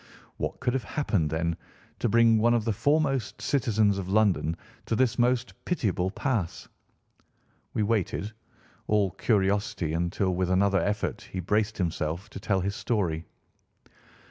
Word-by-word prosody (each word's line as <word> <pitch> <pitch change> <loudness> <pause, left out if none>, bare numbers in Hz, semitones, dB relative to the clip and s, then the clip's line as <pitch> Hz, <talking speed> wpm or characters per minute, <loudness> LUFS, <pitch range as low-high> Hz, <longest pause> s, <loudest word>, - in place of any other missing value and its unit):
What - - -3
could 125 - 0
have 130 -3 -1
happened, 100 - 0
then, 85 +2 -1 0.4
to 120 - +1
bring 115 0 +5
one 120 +2 +4
of 115 -2 0
the 115 - +1
foremost 135 -1 +1
citizens 110 -7 +2
of 95 -1 -5
London 95 -6 +2 0.3
to 115 - +1
this 120 0 +1
most 125 +1 +2
pitiable 100 - 0
pass? 105 -4 -2 1.1
We 110 - +2
waited, 105 -1 -1 0.6
all 105 -3 +2
curiosity, 100 -4 0
until 85 +3 0
with 90 0 0
another 95 +1 +3
effort 105 0 -1
he 95 - -3
braced 105 +4 0
himself 85 +3 -2
to - - -7
tell 95 -1 0
his 100 +2 -2
story. 85 -9 -1
105 Hz, 145 wpm, -27 LUFS, 95-115 Hz, 1.1 s, bring